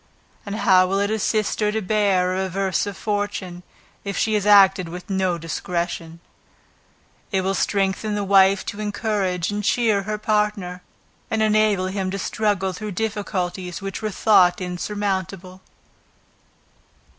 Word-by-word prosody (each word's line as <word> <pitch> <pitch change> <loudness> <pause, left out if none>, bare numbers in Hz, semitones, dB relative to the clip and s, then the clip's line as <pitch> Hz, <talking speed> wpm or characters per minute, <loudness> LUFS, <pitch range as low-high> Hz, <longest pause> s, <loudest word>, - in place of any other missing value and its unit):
And 200 - -3
how 190 -3 +4
will 195 +1 0
it 205 +1 0
assist 215 0 0
her 210 -1 +1
to 220 - -1
bear 195 -3 +1
a - - -1
reverse 190 +1 -1
of 200 -1 -6
fortune, 205 -4 -3 0.4
if 200 -1 -4
she 220 - +1
has 210 -1 0
acted 195 -3 +6
with 180 +1 -8 0.3
discretion; 165 0 -4 1.1
it 190 -2 +1
will 190 +1 -1
strengthen 200 +2 0
the 205 - -1
wife 195 0 +4
to 205 - -5
encourage 205 -4 -1
and 205 0 -3
cheer 220 -1 +2
her 210 +2 -3
partner, 210 -4 -1 0.5
and 220 0 +1
enable 215 -3 +2
him 190 0 -2
to 195 - -3
struggle 200 -2 -1
through 210 +1 -6
difficulties 185 -4 -3
which 195 0 -6
were 215 - -2
thought 185 -4 +4
insurmountable. 190 0 -4
195 Hz, 140 wpm, -22 LUFS, 185-210 Hz, 1.1 s, acted